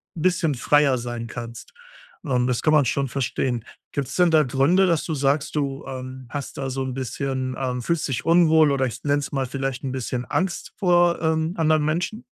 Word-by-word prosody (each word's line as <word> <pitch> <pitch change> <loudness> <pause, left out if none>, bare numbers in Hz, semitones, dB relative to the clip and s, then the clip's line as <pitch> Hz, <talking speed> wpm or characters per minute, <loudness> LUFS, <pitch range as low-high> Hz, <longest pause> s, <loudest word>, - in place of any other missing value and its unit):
bisschen 165 -3 +1
freier 140 +1 +3
sein 120 -1 -5
kannst. 120 0 -8 0.5
Und 125 -5 +1
das 125 -2 0
kann 155 - +3
man 150 - +5
schon 135 +3 0
verstehen. 125 -2 -2 0.3
Gibt's 140 -2 -3
denn 175 -2 +4
da 155 -1 +5
Gründe, 140 +9 +3
dass 165 -3 +1
du 160 - -2
sagst, 145 +2 0
du, 140 -2 -2
ähm, 130 0 -7
hast 140 -2 -6
da 135 -1 -3
so 135 +1 -3
'n 130 -1 -4
bisschen 130 0 -3
ähm, 125 -2 -2
fühlst 160 +6 -1
dich 120 -4 -3
unwohl, 160 -3 +5
oder, 135 -1 +1
ich 125 0 -7
nenne 145 0 +2
es 140 - -5
mal 135 -2 -1
vielleicht 135 0 -4
'n 135 - -3
bisschen 125 -1 -3
Angst 185 +3 -2
vor, 175 -3 +3
ähm, 160 +1 0
anderen 155 -2 +2
Menschen? 175 +9 -2
140 Hz, 200 wpm, -23 LUFS, 130-160 Hz, 0.5 s, man